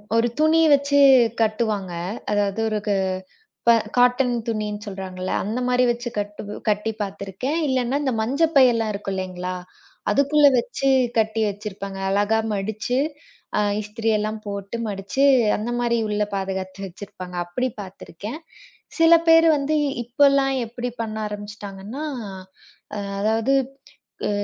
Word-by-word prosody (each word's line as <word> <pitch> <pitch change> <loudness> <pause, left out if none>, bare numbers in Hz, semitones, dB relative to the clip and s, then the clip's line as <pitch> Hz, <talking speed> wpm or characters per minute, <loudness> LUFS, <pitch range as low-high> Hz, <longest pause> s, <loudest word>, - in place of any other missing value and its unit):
ஒரு 230 +1 +3
துணி 315 +1 +4
வைச்சு 285 0 +4 0.4
கட்டுவாங்க. 215 -4 0 0.4
அதாவது 205 0 0
ஒரு 215 -1 -1
க் - - +2 0.8
ப - - +8 0.3
காட்டன் 250 0 +4
துணி 215 -2 -1
என்று 205 +1 -7
சொல்றாங்க 190 -2 -7
அல்ல. 185 - -2
அந்த 220 +5 -2
மாதிரி 250 0 +3
வைச்சு 240 0 -2
கட்டு 205 0 -4 0.3
கட்டிப் 215 +1 -1
பார்த்திருக்கேன். 200 - -4
இல்லன்னா 260 0 +1
அந்த 265 -3 0
மஞ்சள் 285 +8 +1
பை 270 -2 +8
எல்லாம் 225 -2 0
இருக்கும் 200 -1 -4
இல்லீங்களா, 185 -1 -4 0.6
அதுக்குள்ளே 285 +1 +5
வைச்சு 250 +3 0 0.3
கட்டி 220 0 +1
வைச்சிருப்பாங்க. 200 -1 -6
அழகாக 205 +3 +2
மடிச்சு 215 +5 -2 0.6
அ - - +3 0.2
இஸ்திரி 220 +2 -3
எல்லாம் 215 +1 -3
போட்டு 200 +1 -5
மடிச்சு 200 +7 -2 0.3
அந்த 215 +3 -4
மாதிரி 240 -1 +1
உள்ளே 210 0 0
பாதுகாத்து 190 0 -4
வைச்சிருப்பாங்க. 185 -1 -9
அப்படி 250 +9 -2
பார்த்திருக்கேன். 200 - -8 0.6
சில 330 0 +7 0.2
பேர் 330 0 +7
வந்து 285 +2 0 0.3
இப்போ 245 +4 +1
எல்லாம் 270 -1 +2
எப்படி 245 +2 -4
பண்ண 220 -1 -4
ஆரம்பித்திட்டாங்க 205 -1 -8
என்றால், 285 +6 -5 0.8
அ - - -3 0.2
அதாவது, 225 +5 +1 0.7
அ - - -1
220 Hz, 135 wpm, -23 LUFS, 200-250 Hz, 0.8 s, ப